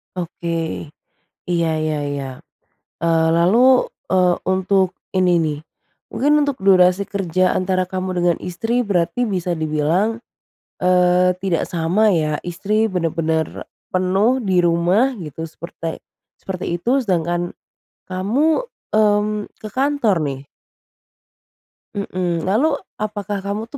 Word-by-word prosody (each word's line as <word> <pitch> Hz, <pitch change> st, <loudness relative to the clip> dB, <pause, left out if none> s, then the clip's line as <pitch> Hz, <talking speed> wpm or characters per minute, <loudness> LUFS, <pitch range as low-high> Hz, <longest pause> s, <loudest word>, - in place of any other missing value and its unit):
Oke. 165 Hz, -2 st, -3 dB, 0.6 s
Iya 170 Hz, -2 st, +1 dB
iya 155 Hz, -1 st, -1 dB
iya. 140 Hz, -1 st, -3 dB, 0.7 s
Eee, 165 Hz, -1 st, +2 dB
lalu, 230 Hz, +10 st, +4 dB, 0.2 s
eee, 180 Hz, -1 st, +4 dB
untuk 190 Hz, 0 st, +2 dB, 0.3 s
ini 180 Hz, -2 st, +3 dB
nih, 150 Hz, -2 st, -1 dB, 0.5 s
mungkin 295 Hz, +2 st, +3 dB
untuk 285 Hz, -5 st, -2 dB
durasi 185 Hz, 0 st, +4 dB
kerja 185 Hz, -2 st, 0 dB
antara 185 Hz, -1 st, 0 dB
kamu 185 Hz, 0 st, -3 dB
dengan 175 Hz, -1 st, +2 dB
istri 225 Hz, +7 st, -1 dB
berarti 200 Hz, +4 st, 0 dB
bisa 180 Hz, -6 st, -1 dB
dibilang, 160 Hz, +8 st, 0 dB, 0.6 s
eee, 180 Hz, 0 st, +3 dB
tidak 175 Hz, -4 st, 0 dB
sama 180 Hz, +6 st, +2 dB
ya? 155 Hz, -5 st, +1 dB
Istri 210 Hz, +5 st, 0 dB
bener-bener 165 Hz, -3 st, -2 dB, 0.2 s
penuh 195 Hz, +8 st, +2 dB
di 185 Hz, -5 st, +2 dB
rumah 175 Hz, +10 st, +3 dB
gitu, 160 Hz, 0 st, -6 dB
seperte 165 Hz, 0 st, -7 dB, 0.4 s
seperti 180 Hz, -2 st, -4 dB
itu, 250 Hz, +7 st, +2 dB
sedangkan 175 Hz, -2 st, -1 dB, 0.5 s
kamu, 235 Hz, -, +1 dB, 0.3 s
mmm, 210 Hz, 0 st, +2 dB
ke 215 Hz, -, -8 dB
kantor 260 Hz, -, +1 dB
nih? 140 Hz, -1 st, -4 dB, 1.5 s
Mhm, 180 Hz, -4 st, -2 dB
lalu, 260 Hz, +11 st, +2 dB, 0.2 s
apakah 205 Hz, -2 st, -4 dB
kamu 210 Hz, +3 st, -3 dB
tuh 285 Hz, -, -8 dB
185 Hz, 115 wpm, -20 LUFS, 170-210 Hz, 1.5 s, lalu